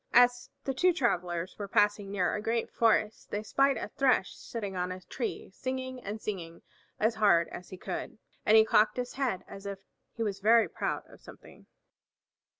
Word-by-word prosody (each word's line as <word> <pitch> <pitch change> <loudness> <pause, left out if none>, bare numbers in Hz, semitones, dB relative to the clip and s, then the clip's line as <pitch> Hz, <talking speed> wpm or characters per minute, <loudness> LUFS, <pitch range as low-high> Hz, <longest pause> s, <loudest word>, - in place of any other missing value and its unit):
As 245 0 +5
the 270 - -1
two 360 +7 +3
travelers 180 - -1
were 200 - -4
passing 205 0 +2
near 190 -3 0
a 210 - -2
great 230 +2 -1
forest 220 -1 +2
they 205 +1 -3
spied 275 +4 +2
a - - -4
Thrush 255 -6 +2
sitting 205 -5 -6
on 180 0 -1
a 185 0 -6
tree 230 +1 -5
singing 260 +1 -4
and 210 +2 -5
singing 170 -6 -6 0.4
as 220 +2 +3
hard 200 -6 +4
as 180 - -9
he 185 - -8
could. 185 +3 -5 0.3
And 215 +1 +6
he 220 - +7
cocked 215 +1 +3
his 245 0 -3
head 255 -9 -1
as 195 0 -9
if 200 -1 -4 0.4
he 230 - -2
was 200 -3 -2
very 225 +3 +5
proud - - -3
of - - -17
something. - - -15
215 Hz, 185 wpm, -30 LUFS, 195-245 Hz, 0.4 s, he